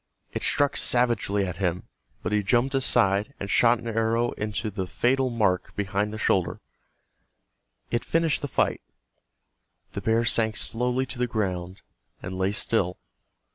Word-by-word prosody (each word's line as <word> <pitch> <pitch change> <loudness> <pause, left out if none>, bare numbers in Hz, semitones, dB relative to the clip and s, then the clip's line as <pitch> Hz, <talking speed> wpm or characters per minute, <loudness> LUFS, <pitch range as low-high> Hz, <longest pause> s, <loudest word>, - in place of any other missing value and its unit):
It - - -3
struck 145 -1 +2
savagely 115 -5 +2
at 90 -2 -5
him, 90 -2 -1 0.4
but - - -2
he 105 0 +2
jumped 120 +6 +1
aside, 105 -2 +2
and 100 - -4
shot 120 0 +5
an 115 - -9
arrow 115 +1 +1
into 105 +1 -3
the 95 -2 -3
fatal 130 +6 +1
mark 100 -6 0
behind 100 +1 -1
the 110 - -5
shoulder. 95 -4 +1 1.3
It 120 - 0
finished 165 -3 +1
the 145 - -2
fight. - - 0 1.1
The - - -4
bear 115 +1 +2
sank 110 -1 +1
slowly 125 +2 0
to 130 -1 -6
the 125 - +1
ground, 95 -5 -3 0.4
and 90 +1 -6
lay 95 +1 0
still. 100 -3 0
110 Hz, 150 wpm, -26 LUFS, 100-120 Hz, 1.3 s, shot